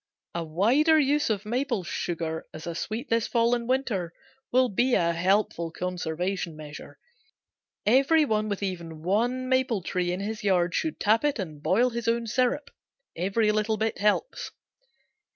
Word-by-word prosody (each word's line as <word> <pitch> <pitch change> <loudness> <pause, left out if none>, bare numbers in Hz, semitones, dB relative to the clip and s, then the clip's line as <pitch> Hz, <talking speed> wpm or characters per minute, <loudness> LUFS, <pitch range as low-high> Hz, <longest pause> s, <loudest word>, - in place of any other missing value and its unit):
A 170 - -2
wider 235 - +3
use 290 -1 +2
of 210 -1 -1
maple 240 -2 -1
sugar 165 -2 -3
as 155 - -8
a 170 - -3
sweet 220 - -4
this 230 -1 +2
fall 235 0 +2
and 240 0 -1
winter 220 -10 0 0.4
will 255 +1 +4
be 245 +4 +2
a 170 0 +2
helpful 180 -1 +1
conservation 180 0 -3
measure. 150 -1 -10 0.9
Every 275 +7 +4
one 215 -4 0
with 200 0 -3
even 170 -5 -5
one 240 +8 0
maple 260 -6 +1
tree 180 0 -1
in 180 - -2
his 215 +2 -4
yard 180 -3 +2
should 320 -1 -1
tap 220 +5 +3
it 295 -2 +1
and 155 -8 -6
boil 235 +10 +3
his 235 -1 -4
own 230 0 +1
syrup. 255 +5 0 0.4
Every 200 +5 +1
little 215 +1 0
bit 220 +1 -1
helps. 210 - 0
210 Hz, 160 wpm, -27 LUFS, 175-245 Hz, 0.9 s, will